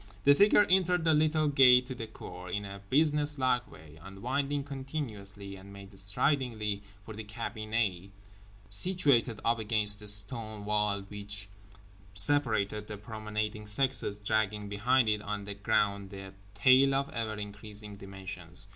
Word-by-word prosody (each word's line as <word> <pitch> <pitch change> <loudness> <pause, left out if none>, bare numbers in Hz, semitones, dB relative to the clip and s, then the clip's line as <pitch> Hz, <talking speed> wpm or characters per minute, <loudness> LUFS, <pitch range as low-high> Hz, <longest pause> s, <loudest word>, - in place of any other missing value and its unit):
The 140 - +6
figure 205 +6 +5
entered 180 -2 +2
the 160 -1 +3
little 155 0 +2
gate 125 -3 +6
to 130 - -6
the 115 -3 -7
cour 90 -4 -10
in 100 +3 -3
a 100 0 -9
business 150 0 +3
like 130 -2 0
way, 80 0 -15
unwinding 130 - -3
continuously, 115 -9 -7
and 95 +1 -13
made 100 0 -13
stridingly 105 0 +1 0.2
for 110 - -9
the 110 +1 -8
cabinet 110 -3 -3 0.6
situated 125 - +1
up 115 0 +1
against 105 -1 +3
the 105 - -7
stone 105 +1 +4
wall 105 -1 0
which 100 0 -5 0.7
separated 105 -3 +2
the 105 - -7
promenading 105 0 -5
sexes—dragging 105 -3 0
behind 120 +4 +1
it 105 -1 0
on 105 -1 -5
the 100 - -5
ground 100 -1 -1
a 95 -1 -9 0.2
tail 130 +5 +4
of 140 0 0
ever 115 -2 -4
increasing 105 0 -7
dimensions. 95 -2 -8
105 Hz, 140 wpm, -29 LUFS, 100-130 Hz, 0.7 s, The